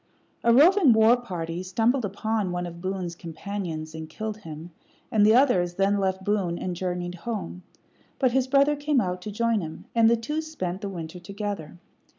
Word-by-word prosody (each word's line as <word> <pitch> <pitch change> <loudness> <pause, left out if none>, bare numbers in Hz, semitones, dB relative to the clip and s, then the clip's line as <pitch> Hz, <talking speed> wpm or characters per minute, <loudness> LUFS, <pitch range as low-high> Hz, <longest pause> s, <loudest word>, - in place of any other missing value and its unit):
A 235 - +5
roving 310 - +6
war 220 +2 +6
party 175 -8 -5
stumbled 225 +7 +1
upon 205 0 -1
one 175 0 -2
of 170 0 -8
Boone's 185 -2 -3
companions 165 -2 -6
and 160 0 -7
killed 215 +5 -5
him, 165 -4 -9 0.4
and 215 -2 +4
the 215 +2 +6
others 185 -10 +3
then 195 +2 +2
left 190 -1 -1
Boone 195 -5 0
and 180 0 -3
journeyed 180 0 -3
home; 180 -2 -5 0.6
but 255 -3 +2
his 260 +1 +1
brother 280 +2 +4
came 290 -1 +1
out 180 -4 -2
to 210 - -6
join 230 0 +1
him, 160 -1 -8
and 230 -1 +5
the 235 - +4
two 300 +8 -3
spent 195 - -5
the 200 - -3
winter 170 -2 -7
together. 200 -3 -5
195 Hz, 180 wpm, -26 LUFS, 175-230 Hz, 0.6 s, roving